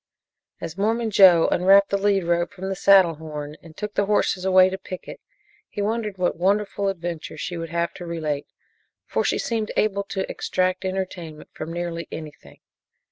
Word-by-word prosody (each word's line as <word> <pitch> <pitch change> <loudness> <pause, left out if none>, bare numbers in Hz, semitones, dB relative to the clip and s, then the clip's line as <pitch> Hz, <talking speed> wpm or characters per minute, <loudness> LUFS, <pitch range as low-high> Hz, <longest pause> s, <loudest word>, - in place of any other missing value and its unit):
As 165 +3 -7
Mormon 225 +2 0
Joe 180 -5 +7
unwrapped 195 +2 +5
the 200 - +2
lead 200 -1 +2
rope 170 0 0
from 190 +1 -5
the 195 - -2
saddle 190 -3 +5
horn 150 -1 -7
and 160 -1 -15
took 210 0 -5
the 200 - 0
horses 200 -2 +1
away 185 -1 +6
to 190 - -4
picket, 185 - -9 0.5
he - - -8
wondered 210 -1 -2
what 180 -1 0
wonderful 200 +2 0
adventure 170 -4 -4
she 175 +3 -4
would 165 -1 -5
have 170 0 -1
to 175 - -9
relate, 155 -4 -3 0.6
for - - -1
she - - +1
seemed 225 -2 -2
able 200 -2 +1
to 195 -1 -3
extract 185 +1 -1
entertainment 185 -4 -5
from 155 +1 -6
nearly 170 -1 -4
anything. 155 -2 -10
185 Hz, 175 wpm, -23 LUFS, 170-200 Hz, 0.6 s, Joe